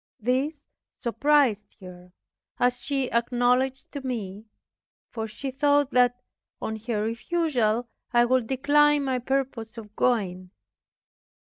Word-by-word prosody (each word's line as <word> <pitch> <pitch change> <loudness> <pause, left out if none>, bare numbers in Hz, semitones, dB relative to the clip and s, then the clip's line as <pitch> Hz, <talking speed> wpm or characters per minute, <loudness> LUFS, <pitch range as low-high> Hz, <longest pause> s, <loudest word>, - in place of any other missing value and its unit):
This 260 +7 0 0.4
surprised 235 -4 +1
her, 180 -1 -12 0.5
as 245 0 +2
she 270 -1 -2
acknowledged 250 +2 +1
to 285 - -6
me; 220 -5 -5 0.7
for 225 -1 -4
she 265 +5 -6
thought 285 +1 +2
that, 245 0 +3 0.4
on 220 - -4
her 215 -3 0
refusal, 240 -2 0 0.2
I 240 0 +4
would 250 -1 +1
decline 290 +2 +3
my 260 -2 0
purpose 255 -3 -3
of 215 -2 -10
going. 185 -7 0
245 Hz, 115 wpm, -26 LUFS, 220-270 Hz, 0.7 s, I